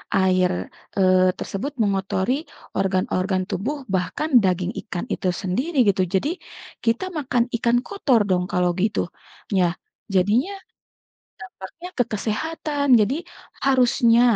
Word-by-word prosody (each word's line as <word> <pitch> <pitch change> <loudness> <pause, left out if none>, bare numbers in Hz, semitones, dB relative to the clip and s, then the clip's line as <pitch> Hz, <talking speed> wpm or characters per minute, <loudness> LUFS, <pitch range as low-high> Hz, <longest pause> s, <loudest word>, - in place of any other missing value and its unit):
air, 185 -1 +3 0.5
eee, 185 -1 +5
tersebut 270 +9 -4
mengotori 195 +2 0 0.4
organ-organ 185 0 0
tubuh 270 +8 -3
bahkan 190 - -1
daging 185 +1 0 0.2
ikan 180 0 -3
itu 185 - -1
sendiri 200 - -2
gitu. 195 -2 +3
Jadi, 190 +10 +1 0.5
kita 230 +8 +1
makan 255 -5 +1
ikan 235 +1 +2
kotor 275 - +2
dong 180 -1 +2
kalau 180 -2 +1
gitu, 210 +1 +1 0.5
ya. 180 -3 +3 0.4
Jadinya, 215 - +2 0.9
dampaknya 250 - -9
ke 245 - +4
kesehatan 285 +7 -2
jadi 220 +7 +2 0.5
harusnya 245 -3 +4
205 Hz, 115 wpm, -23 LUFS, 185-255 Hz, 0.9 s, eee